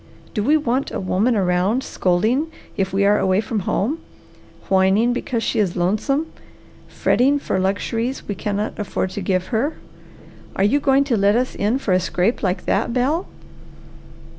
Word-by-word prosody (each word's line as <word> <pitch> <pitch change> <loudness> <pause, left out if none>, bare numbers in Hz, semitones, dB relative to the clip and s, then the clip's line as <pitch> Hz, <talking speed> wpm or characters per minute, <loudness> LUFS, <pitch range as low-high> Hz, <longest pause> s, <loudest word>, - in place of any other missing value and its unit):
Do 215 - -1
we 300 +7 +4
want 265 -2 -1
a - - -4
woman 200 +6 +1
around 190 +5 +1
scolding 220 - +1 0.3
if 190 -1 -1
we 200 +1 +2
are 205 +1 +4
away 190 0 +2
from 220 0 -2
home, 280 +11 0 0.7
whining 195 +5 +3
because 240 -2 -2
she - - 0
is 190 -5 +1
lonesome, 215 - 0 0.6
fretting 275 +4 +2
for 235 -9 -2
luxuries 225 +6 -2
we 205 - -2
cannot 210 +2 -3
afford 190 -2 -2
to 200 - -5
give 185 -1 -1
her? 270 +8 0 0.8
Are 195 - +1
you 225 +9 +3
going 275 -1 +3
to 260 -5 0
let 200 +1 +3
us 255 +2 0
in 215 +5 0
for 250 -7 -3
a 185 - +4
scrape 185 +5 0
like 185 -2 -1
that, 220 +3 0
Bel?" 280 +9 0
210 Hz, 165 wpm, -21 LUFS, 190-255 Hz, 0.8 s, we